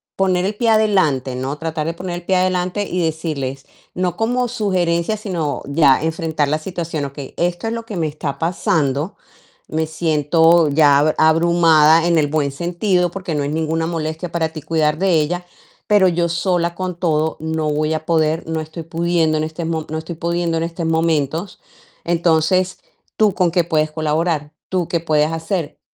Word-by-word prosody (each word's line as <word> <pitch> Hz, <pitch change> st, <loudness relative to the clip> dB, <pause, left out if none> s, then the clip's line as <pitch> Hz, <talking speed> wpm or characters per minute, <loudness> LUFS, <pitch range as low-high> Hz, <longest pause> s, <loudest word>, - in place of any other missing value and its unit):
poner 185 Hz, -1 st, +1 dB
el 200 Hz, -, -1 dB
pie 230 Hz, +2 st, +1 dB
adelante, 185 Hz, -, +2 dB
¿no? 135 Hz, +3 st, -3 dB
Tratar 160 Hz, -1 st, -3 dB
de 165 Hz, -, -3 dB
poner 175 Hz, 0 st, -5 dB
el 175 Hz, -, -9 dB
pie 190 Hz, -, +1 dB
adelante 185 Hz, +2 st, 0 dB
y 180 Hz, -1 st, -1 dB
decirles, 150 Hz, -5 st, -3 dB, 0.3 s
no 180 Hz, -1 st, -1 dB
como 245 Hz, +4 st, 0 dB
sugerencia, 185 Hz, -4 st, 0 dB
sino 175 Hz, -8 st, -3 dB
ya 140 Hz, -1 st, +3 dB
enfrentar 160 Hz, -2 st, -1 dB
la 155 Hz, +1 st, 0 dB
situación: 165 Hz, -3 st, -4 dB
"Okey, 140 Hz, 0 st, -8 dB
esto 175 Hz, +3 st, -1 dB
es 225 Hz, -, -1 dB
lo 230 Hz, 0 st, -4 dB
que 220 Hz, -4 st, -7 dB
me 165 Hz, -, 0 dB
está 145 Hz, -2 st, -4 dB
pasando, 160 Hz, -2 st, 0 dB, 0.5 s
me 160 Hz, 0 st, -1 dB
siento 160 Hz, +1 st, +3 dB
ya 145 Hz, -1 st, +5 dB
ab 155 Hz, +1 st, +2 dB
abrumada 165 Hz, 0 st, +5 dB
en 170 Hz, -1 st, +3 dB
el 150 Hz, -, +2 dB
buen 145 Hz, -1 st, 0 dB
sentido, 175 Hz, +4 st, 0 dB
porque 180 Hz, -1 st, -5 dB
no 145 Hz, -1 st, 0 dB
es 140 Hz, -, -2 dB
ninguna 160 Hz, +1 st, -1 dB
molestia 165 Hz, +1 st, -4 dB
para 165 Hz, -2 st, 0 dB
ti 155 Hz, -1 st, -8 dB
cuidar 155 Hz, 0 st, 0 dB
de 190 Hz, -1 st, +2 dB
ella, 175 Hz, +4 st, -2 dB, 0.4 s
pero 205 Hz, -3 st, +5 dB
yo 170 Hz, -1 st, +1 dB
sola 170 Hz, 0 st, 0 dB
con 185 Hz, -1 st, -3 dB
todo 160 Hz, -2 st, 0 dB
no 160 Hz, -1 st, -2 dB
voy 155 Hz, +1 st, 0 dB
a 155 Hz, 0 st, -5 dB
poder, 160 Hz, -1 st, +1 dB
no 160 Hz, -1 st, -2 dB
estoy 155 Hz, +2 st, -8 dB
pudiendo 165 Hz, -1 st, 0 dB
en -, -, 0 dB
este 160 Hz, +2 st, -5 dB
mo 160 Hz, -1 st, -3 dB
no 155 Hz, -, -3 dB
estoy 160 Hz, +2 st, -6 dB
pudiendo 170 Hz, 0 st, -1 dB
en 165 Hz, -, -1 dB
estos 165 Hz, 0 st, -4 dB
momentos. 160 Hz, +2 st, 0 dB, 0.5 s
Entonces, 170 Hz, +2 st, +1 dB, 0.4 s
¿tú 215 Hz, -2 st, +3 dB
con 180 Hz, -1 st, +2 dB
qué 175 Hz, 0 st, +2 dB
puedes 155 Hz, -2 st, 0 dB
colaborar? 155 Hz, -1 st, -1 dB, 0.2 s
¿Tú 180 Hz, -3 st, -1 dB
qué 170 Hz, -, 0 dB
puedes 155 Hz, -1 st, +1 dB
hacer?" 165 Hz, -1 st, -3 dB
165 Hz, 185 wpm, -19 LUFS, 155-175 Hz, 0.5 s, ya